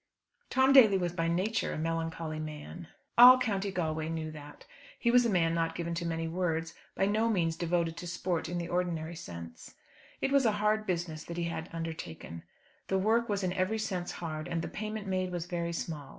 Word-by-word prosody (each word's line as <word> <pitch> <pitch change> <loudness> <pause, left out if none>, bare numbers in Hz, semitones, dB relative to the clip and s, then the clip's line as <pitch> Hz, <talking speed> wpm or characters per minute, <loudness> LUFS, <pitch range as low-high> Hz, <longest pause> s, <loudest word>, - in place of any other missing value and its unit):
Tom 265 +1 +4
Daly 220 -8 +8
was 175 -2 -1
by 165 -1 -1
nature 190 +6 0
a - - -4
melancholy 165 0 -3
man. 155 +2 -7 0.3
All 250 +1 +11
County 205 -5 -1
Galway 160 -3 -2
knew 160 -1 -3
that. 150 -1 -11 0.3
He 235 - +2
was 245 -1 +5
a - - 0
man 165 -4 +2
not 165 -1 0
given 170 0 -3
to 170 0 -2
many 165 0 -2
words, 165 -1 -1 0.2
by 195 - +2
no 215 +3 +2
means 170 -6 +1
devoted 170 -1 -1
to 175 - -6
sport 170 -1 -2
in 175 - -2
the 170 -1 -3
ordinary 170 -2 -2
sense. 85 - -9 0.4
It - - 0
was 275 -3 +4
a 215 - +3
hard 210 +1 +1
business 170 -3 -2
that 170 - -7
he 175 - -1
had 170 0 -4
undertaken. 160 - -6 0.5
The 190 - +1
work 225 +4 +2
was 200 -1 0
in 180 -1 0
every 185 +4 0
sense 190 -5 -3
hard, 155 -2 -5
and 165 -1 -2
the - - -3
payment 215 0 -5
made 185 -1 -1
was 175 -2 -3
very 170 -1 -2
small. 155 -4 -5
170 Hz, 205 wpm, -31 LUFS, 165-195 Hz, 0.5 s, All